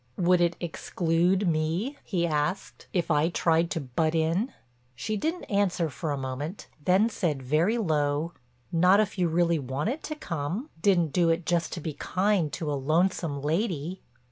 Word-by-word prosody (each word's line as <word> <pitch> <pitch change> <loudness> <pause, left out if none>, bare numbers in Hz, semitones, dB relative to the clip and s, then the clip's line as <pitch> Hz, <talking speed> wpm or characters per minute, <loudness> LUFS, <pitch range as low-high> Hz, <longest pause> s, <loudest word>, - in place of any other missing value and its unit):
"Would 180 0 +3
it 170 0 +2
exclude 175 +2 0
me," 165 - 0
he 175 -5 0
asked, 155 +3 -2
"if 175 -2 0
I 150 +2 +3
tried 165 -1 +2
to - - -2
butt 155 +4 -1
in?" 165 +10 +1 0.4
She 215 - -3
didn't 320 - -2
answer 185 -6 0
for 160 +3 -4
a 145 - -1
moment, 135 +7 -5 0.2
then 190 +6 +4
said 165 - -2
very 160 - +2
low: 155 -4 0 0.4
"Not 180 +4 +5
if 210 -2 0
you 175 - +3
really 170 0 +2
wanted 145 - -2
to 305 - -4
come—didn't 175 - -1
do 175 -2 +3
it 165 +1 +1
just 170 0 0
to - - -4
be 155 0 -4
kind 185 -1 0
to 155 -3 -2
a - - 0
lonesome 155 +1 0
lady." 170 +1 -1
170 Hz, 165 wpm, -27 LUFS, 155-190 Hz, 0.4 s, Not